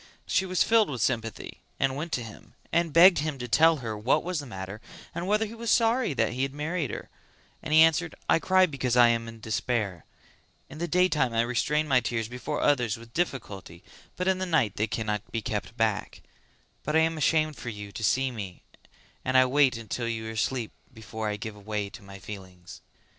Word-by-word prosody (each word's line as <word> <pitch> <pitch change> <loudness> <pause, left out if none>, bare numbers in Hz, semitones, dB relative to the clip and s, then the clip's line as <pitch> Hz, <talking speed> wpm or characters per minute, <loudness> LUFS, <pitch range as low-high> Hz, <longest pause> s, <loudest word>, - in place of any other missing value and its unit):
She 190 0 +1
was 185 -1 +2
filled 225 -4 +4
with 130 -4 -4
sympathy 115 -2 -2 0.2
and 135 0 +1
went 160 +4 -5
to 120 - -1
him 110 -2 -13 0.2
and 170 -1 +2
begged 175 +3 +7
him 150 -1 -2
to 125 -1 -5
tell 160 +6 +5
her 110 -1 -3
what 125 +8 +1
was 180 -2 -2
the 145 - -7
matter 95 0 -7 0.3
and 175 - -4
whether 210 +2 +2
he 220 - -8
was 230 0 -5
sorry 230 - +2
that 115 -1 +1
he 130 - -3
had 135 +1 -2
married 155 -1 -2
her; - - -7 0.5
and 155 - -6
he 155 +1 +7
answered 165 +1 +2
"I - - +4
cry 185 +2 +4
because 130 -6 -1
I 120 -1 +7
am 115 0 0
in 115 0 -10
despair; 110 -4 -2 0.7
in 155 - -9
the 170 - -2
daytime 155 -8 +2
I 115 - +4
restrain 125 +6 0
my 135 -3 +4
tears 115 -3 -2
before 125 +5 -4
others 125 -6 +2
with 115 0 -14
difficulty 100 - -4 0.3
but 180 - -2
in 190 -1 +2
the 185 - -2
night 140 - +1
they 110 - 0
cannot 105 -2 -3
be 115 -2 -3
kept 110 +2 -4
back; 110 -2 -1 0.6
but 150 - -2
I 160 - +6
am 165 0 +1
ashamed 155 0 +1
for 120 - -6
you 105 -2 -8
to 110 +2 -7
see 130 +4 +2
me 100 -6 -7 0.6
and 130 0 +2
I 130 - +7
wait 130 -4 +2
till 120 -2 -2
you 110 -1 -3
are - - -4
asleep 115 +1 -2 0.2
before 110 -1 -6
I 105 - -2
give 110 +1 -6
way 105 -2 -2
to - - -11
my 100 0 -11
feelings." 95 -2 -10
125 Hz, 210 wpm, -27 LUFS, 110-160 Hz, 0.7 s, begged